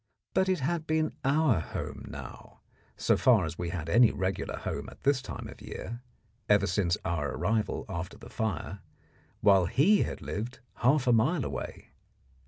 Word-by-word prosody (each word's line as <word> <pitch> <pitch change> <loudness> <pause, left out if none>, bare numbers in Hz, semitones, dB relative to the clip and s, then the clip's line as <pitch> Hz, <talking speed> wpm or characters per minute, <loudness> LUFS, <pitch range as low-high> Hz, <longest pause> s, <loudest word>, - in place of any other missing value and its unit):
But 190 0 +2
it 185 -5 +1
had 160 +3 -1
been 155 0 +1
our 140 - +3
home - - -5
now, - - -10 0.4
so - - +3
far - - +4
as 80 +1 -6
we 85 -1 -2
had 85 -3 -4
any 115 +7 +6
regular 95 -1 -2
home - - -4
at - - -16
this 140 -2 +3
time 120 -3 -7
of 110 0 -12
year, 110 +2 -7 0.5
ever 105 -1 +5
since 85 -1 +1
our 75 -5 -1
arrival 110 -2 0
after 90 +2 -5
the 115 +2 -12
fire, 110 -8 -3 0.6
while 95 -4 +5
he 190 - +4
had - - -2
lived 115 +5 -4 0.2
half 135 +2 +3
a 125 - +4
mile 135 +7 +2
away. - - -6
110 Hz, 170 wpm, -29 LUFS, 95-135 Hz, 0.6 s, any